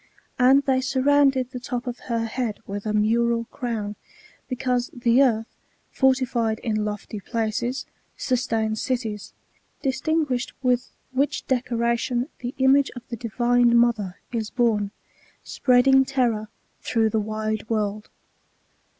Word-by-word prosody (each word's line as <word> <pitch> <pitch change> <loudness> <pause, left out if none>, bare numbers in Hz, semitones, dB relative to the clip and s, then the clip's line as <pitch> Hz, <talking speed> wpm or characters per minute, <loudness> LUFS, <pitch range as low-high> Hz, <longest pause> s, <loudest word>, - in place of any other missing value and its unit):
And 265 +3 +6
they 260 -1 +2
surrounded 265 -1 +2
the 250 - -5
top 245 0 -4
of 245 -1 -5
her 230 -1 0
head 225 -1 -2
with 200 +2 -5
a - - 0
mural 230 +2 +2
crown, 220 -5 -4 0.5
because 250 -1 -1
the 240 +1 +3
earth, 225 -4 +1 0.4
fortified 250 -4 +2
in 215 -3 0
lofty 210 0 -5
places, 230 +4 -2 0.3
sustains 225 -4 0
cities; 220 -6 -3 0.5
dis 265 -2 -1
tinguished 300 -6 0
with 250 0 +1 0.2
which 275 +3 0
decoration 240 +1 0
the 245 +1 -5
image 270 +1 +4
of 245 0 -10
the 235 - -3
divine 240 +1 +2
mother 225 -6 +2
is 225 -3 -2
borne, 220 -5 +1 0.5
spreading 265 +1 +4
terror, 245 -5 0 0.3
through 225 -2 +1
the 220 - +1
wide 215 0 -3
world. 215 -1 -2
240 Hz, 125 wpm, -24 LUFS, 220-255 Hz, 0.5 s, And